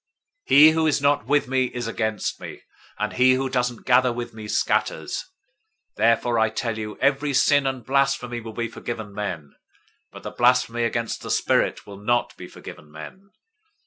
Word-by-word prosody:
012:030 - - +5
"He 155 +2 +9
who 160 0 +1
is 150 - +2
not 140 -4 +1
with 145 0 +2
me 130 0 +1
is 120 -1 -5
against 110 -2 -3
me, - - -10 0.3
and 105 0 -2
he 130 +1 +4
who 135 +1 -1
doesn't 125 -2 -2
gather 125 0 +4
with 120 0 -6
me, 110 -1 -9
scatters. - - -1 0.7
012:031 - - -41
Therefore 115 +2 +2
I 110 0 +3
tell 115 0 -3
you, 105 -1 -6
every 140 +1 +1
sin 145 0 +3
and 130 -3 -4
blasphemy 135 -3 0
will 110 0 -9
be 115 +1 -3
forgiven 110 -3 -7
men, 85 -8 -5 0.6
but - - -12
the - - -6
blasphemy 120 -1 +2
against 115 0 -3
the - - -8
Spirit - - +1
will 100 -1 -11
not 120 +4 0
be - - -10
forgiven 75 - -12
men. 185 - -11
120 Hz, 180 wpm, -23 LUFS, 110-135 Hz, 0.7 s, He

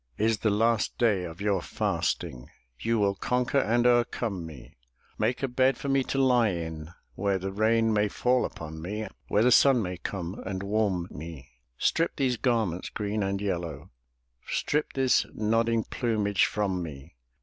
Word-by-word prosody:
Is 110 0 +1
the 110 - +1
last 110 +2 +1
day 105 -6 +2
of 85 +2 -9
your 100 -3 +1
fasting. 60 -6 -2 0.3
You 115 0 0
will 100 -2 +2
conquer 125 +6 0
and 120 0 +2
overcome 120 -7 +1
me; 75 -5 -12 0.4
Make 125 - 0
a - - +2
bed 130 +2 +2
for 140 - -4
me 135 -1 +3
to - - -2
lie 125 -4 +4
in, 80 -3 -5 0.2
Where 100 +6 0
the 95 +1 -4
rain 110 +2 +2
may 105 0 +2
fall 125 +4 +1
upon 80 0 -6
me. 105 +6 -4 0.2
Where 105 - +2
the 125 - +4
sun 135 +1 +6
may 90 -1 -4
come 90 +1 -5
and 95 0 -4
warm 100 -4 0
me; 80 -4 -9 0.3
Strip 165 - +1
these 130 -4 +1
garments, 110 -9 0
green 105 0 -2
and 100 0 -1
yellow, 85 -5 -4 0.6
Strip 150 +1 -1
this 130 -2 +2
nodding 115 +1 +1
plumage 105 -5 +1
from 95 -4 -1
me. 70 -5 -8
105 Hz, 165 wpm, -28 LUFS, 90-120 Hz, 0.6 s, sun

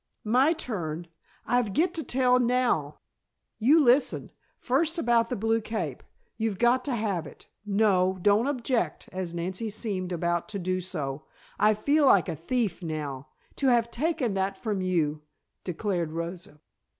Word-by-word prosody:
"My 255 +8 +4
turn. 175 - -4 0.4
I've 245 -5 +1
get 340 +5 +2
to 325 -3 -3
tell 250 -1 +3
now; 240 - +1 0.6
you 275 +9 +5
listen. 270 -1 +3 0.3
First 310 +6 0
about 235 -5 +2
the 250 - -1
blue 225 +1 +1
cape. 220 0 -4 0.4
You've 220 -3 -1
got 240 +3 +3
to 275 -4 0
have 200 -7 -1
that. 145 - -13 0.2
No, 195 -3 +2
don't 205 +6 +3
object," 245 - -1
as 185 -2 -4
Nancy 185 +6 -3
seemed 200 -4 -4
about 175 +1 -1
to 210 - -4
do 185 0 -1
so. 150 -6 -5 0.3
"I 210 +1 +4
feel 285 +7 +3
like 195 -9 +5
a - - -3
thief 190 - -1
now. 150 -4 -5 0.3
To 275 - +1
have 235 -2 +3
taken 260 -4 0
that 195 0 -1
from 210 -3 -2
you," 160 -5 0 0.4
declared 175 -3 -2
Rosa. 170 -2 -6
210 Hz, 150 wpm, -27 LUFS, 175-245 Hz, 0.6 s, you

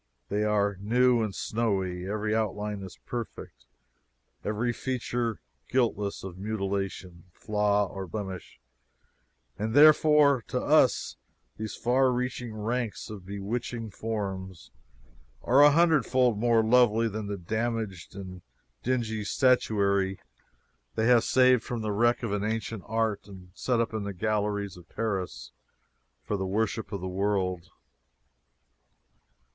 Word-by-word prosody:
They 105 +1 0
are 100 -2 +1
new 120 +3 +3
and 105 -3 -2
snowy; 95 -5 -1
every 105 +1 -1
outline 105 -1 -2
is 95 -2 -9
perfect, 105 - -7 0.8
every 110 +3 -1
feature 120 -2 -2 0.3
guiltless 110 -6 0
of 95 -1 -8
mutilation, 95 -4 -4
flaw, 105 +2 +1
or 95 0 -7
blemish; 95 0 -6 1.0
and 110 +3 -2
therefore, 150 -3 +6
to - - -1
us - - +3 0.4
these 110 -1 -5
far 130 +1 +2
reaching 125 -1 -3
ranks 115 +1 -3
of 95 -4 -9
bewitching 110 +3 -4
forms 95 -5 -5 0.7
are 130 +4 +5
a 145 - +9
hundred 160 -4 +3
fold 125 -3 +3
more 115 +1 +3
lovely 115 -1 +4
than 110 -1 -4
the 100 0 -3
damaged 110 -1 -3
and 95 -2 -8 0.4
dingy 115 -4 -1
statuary 100 -6 +2 0.8
they 110 - +1
have 120 -1 +5
saved 130 -2 +4
from 120 -2 -4
the 105 - -1
wreck 120 +4 +2
of 110 -3 -2
ancient 110 -1 -3
art 110 -2 -1
and 95 -3 -13
set 120 +3 0
up 115 -1 0
in 110 -2 -2
the 100 0 -4
galleries 105 -1 -1
of 90 - -15
Paris 95 - -3 0.7
for 105 - -2
the 95 0 -2
worship 110 +3 -1
of 100 - -4
the 95 - -4
world. 95 -2 -1
110 Hz, 130 wpm, -28 LUFS, 100-120 Hz, 1.0 s, a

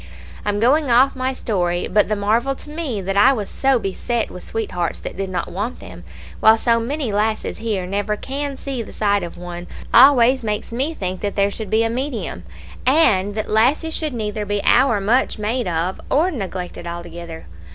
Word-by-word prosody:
I'm 205 0 0
going 275 +5 +3
off 255 +3 +5
of - - -17
my 260 0 -1
story; 180 -8 -1
but 210 -1 +2
the 215 - +1
marvel 225 +6 +1
to 295 - -12
me 300 -10 -3
that 195 +1 -2
I 250 +7 +6
was 210 -6 -4
so 270 -1 +2
beset 230 +3 -2
with 180 - -9
sweethearts 180 -6 -3
that - - -7
did 195 0 -3
not 185 - -3
want 210 +7 -4
them, 85 - -11 0.4
while 220 +1 +6
so 230 0 +2
many 260 +1 -2
lasses 215 +1 -1
here 215 -5 -2
never 205 +3 -2
Can 275 +2 -4
see 270 -3 -4
the 225 - -9
sight 205 -1 +1
of 170 -1 -7
one, 175 0 -7 0.3
always 260 0 +7
makes 210 -1 -3
me 275 +7 -1
think 185 -4 -4
that 205 -1 -3
there 200 0 +2
should 215 -1 -6
be 220 +2 +3
a 225 - 0
medium, 235 - -4 0.4
and 210 -9 +3
that 215 - -2
lasses 270 +9 +2
should 305 -5 -2
neither 210 -1 -3
be 205 0 -1
ower 240 -4 +4
much 230 +7 +1
made 220 +3 -1
of 175 +2 -2
or 330 +7 +2
neglected 185 - -5
altogether. 170 -1 -7
220 Hz, 195 wpm, -20 LUFS, 195-255 Hz, 0.4 s, always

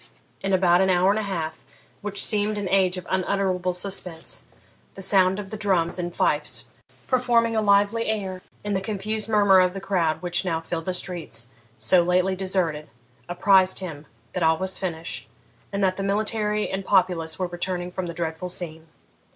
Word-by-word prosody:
In 195 - -1
about 180 -1 +4
an 190 - +3
hour 185 +1 +4
and 210 - +1
a 205 -2 -3
half, 160 -4 -4 0.4
which 200 -1 0
seemed 210 0 +1
an 205 -2 -2
age 190 -1 +3
of 180 - -6
unutterable 185 -1 0
suspense, 180 -2 -3 0.5
the 195 - -8
sound 190 -1 +4
of 200 -2 -7
the 215 - -4
drums 185 -4 +1
and 175 0 -2
fifes 150 -3 0 0.4
performing 240 -3 +2
a 220 - +2
lively 205 +2 +3
air, 195 -4 -2 0.2
and 205 -1 -1
the 190 - 0
confused 215 +2 -3
murmur 200 -3 +5
of 180 0 +2
the - - -3
crowd 180 -5 0
which 175 +1 0
now 165 -3 -1
filled 165 0 -4
the 185 - -1
streets, 165 -11 -3 0.3
so 115 +12 +4
lately 180 +2 +2
deserted, 180 -5 -1 0.4
apprised 185 +1 +4
him 155 -6 -6 0.3
that 180 - -2
all 160 0 +4
was 190 +2 -2
finished, 165 -3 -4 0.4
and 200 0 -1
that 185 -1 +2
the 195 - -2
military 210 +1 0
and 190 +1 -3
populace 180 -5 +1
were 185 - -1
returning 175 0 -3
from 180 0 -4
the 170 - -5
dreadful 165 +1 -3
scene. 165 -2 -5
185 Hz, 180 wpm, -24 LUFS, 175-200 Hz, 0.5 s, murmur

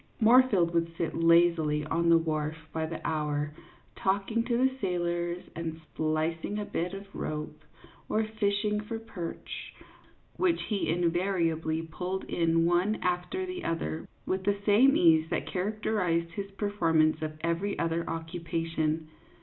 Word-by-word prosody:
Moorfield 225 -7 +5
would 165 0 +1
sit 165 - -2
lazily 165 -3 +4
on 170 +2 +1
the 165 - +7
wharf 155 -1 -1 0.2
by 160 -1 -1
the 165 0 -5
hour, 150 -1 -1 0.4
talking 200 +4 0
to 240 -1 +1
the 260 +2 +3
sailors 175 -2 -1
and 160 -1 -4
splicing 160 +5 -1
a 210 - -2
bit 180 +1 -2
of 195 +1 -8
rope, 150 0 -4 0.5
or 220 - +2
fishing 210 -1 0
for 215 +2 -4
perch, 210 -7 -7 0.6
which 355 -2 +2
he 210 -3 -1
invariably 165 -2 +1
pulled 180 +3 -4
in 165 -1 +2
one 175 +5 +2
after 180 - -1
the 365 0 -5
other 80 - -2 0.2
with 190 0 -1
the 200 +1 +1
same 250 +8 +6
ease 160 -1 +5
that - - -1
char 185 +3 -1
acterized 180 -6 0
his 195 +2 -5
performance 165 -7 +1
of 155 0 -4
every 170 +5 -1
other 165 0 0
occupation. 165 -1 -2
170 Hz, 140 wpm, -29 LUFS, 165-200 Hz, 0.6 s, the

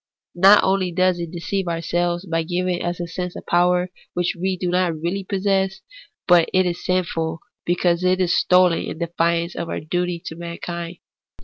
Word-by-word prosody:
Not 195 +4 +6
only 190 -1 +1
does 185 0 +2
it 170 -1 -4
deceive 180 +2 -3
ourselves 175 +2 -1
by 165 -2 0
giving 180 +1 -1
us 175 0 -3
a 175 - -2
sense 180 +1 -5
of - - -8
power 180 +1 +2 0.2
which 175 0 0
we 185 +2 -2
do 180 -1 -2
not 180 -3 +1
really 175 +5 -2
possess, 195 0 0 0.5
but 175 -3 +5
it 185 0 +4
is 175 -1 -3
sinful, 165 -3 -1 0.2
because 175 0 +1
it 185 0 +2
is 175 -2 +2
stolen 180 -2 +4
in - - -5
defiance 170 0 0
of 170 -1 -4
our - - -3
duty 175 +2 -2
to 160 - -6
mankind. 170 0 -6
175 Hz, 180 wpm, -22 LUFS, 170-185 Hz, 0.5 s, Not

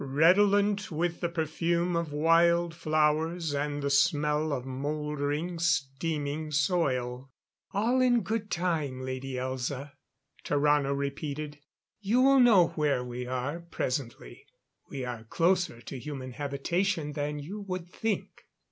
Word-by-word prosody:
Redolent 200 +8 +3
with 170 +2 -1
the 170 - -1
perfume 170 +1 0
of 170 -2 -1
wild 170 +2 +3
flowers 155 0 +1
and 145 0 -2
the 140 - 0
smell 150 +1 +2
of 130 -3 -2
mouldering, 150 +4 -2
steaming 150 0 -1
soil. 135 -5 0 0.4
"All 230 +5 +2
in 245 -2 +4
good 220 -1 -2
time. 160 -7 -1
Lady 130 +1 -4
Elza," 130 +2 -3 0.5
Tarrano 145 -1 +2
repeated. 145 +1 -4 0.4
"You 215 +4 +1
will 275 0 +6
know 205 -9 +6
where 145 -5 0
we 125 0 -5
are 130 +6 -2
presently; 125 - -5 0.4
we 135 -2 -4
are 120 -3 -5
closer 175 0 +1
to 130 +3 -7
human 130 -2 -6
habitation 150 +5 -1
than 150 0 -2
you 180 +9 -6
would 185 -3 -5
think." 220 +4 -4
150 Hz, 125 wpm, -29 LUFS, 140-170 Hz, 0.5 s, will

